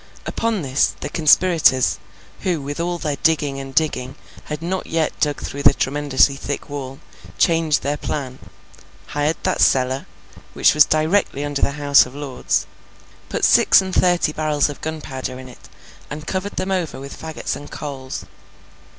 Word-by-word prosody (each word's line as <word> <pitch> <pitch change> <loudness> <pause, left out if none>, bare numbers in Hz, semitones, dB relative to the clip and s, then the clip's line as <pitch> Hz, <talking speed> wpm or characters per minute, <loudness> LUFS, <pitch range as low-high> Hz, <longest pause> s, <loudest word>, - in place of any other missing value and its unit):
Upon 225 -6 -1
this, 135 +1 +1
the - - -4
conspirators, 155 - +4 0.4
who 180 -5 -1
with 145 +2 -6
all 175 +1 -1
their 150 -4 -3
digging 145 -3 +1
and 135 -1 -8
digging 135 -4 0 0.3
had 150 +1 -5
not 185 +2 -3
yet 160 -1 0
dug 145 -2 0
through 140 - -5
the - - +5
tremendously 140 0 +2
thick 145 +1 -5
wall, 135 -2 -6 0.4
changed 165 -2 +2
their 145 +1 -1
plan; 135 -3 -4 0.7
hired 150 +2 0
that - - 0
cellar, 130 +1 +2 0.5
which - - +4
was 150 0 +7
directly 155 -1 +1
under 145 -1 -3
the 140 - +1
House 145 -2 +4
of 125 - -13
Lords; 145 -3 -2 0.6
put - - 0
six - - +6
and 190 -1 -3
thirty 175 -4 +3
barrels 155 -2 +1
of 145 - -8
gunpowder 135 -5 -5
in 130 0 -10
it, 125 - -15 0.4
and 150 +1 -7
covered 190 +4 -3
them 185 +1 -2
over 180 -7 -2
with 140 +1 -8
fagots 160 -1 -5
and 145 - -9
coals. 135 -3 -6
145 Hz, 160 wpm, -21 LUFS, 135-160 Hz, 0.7 s, was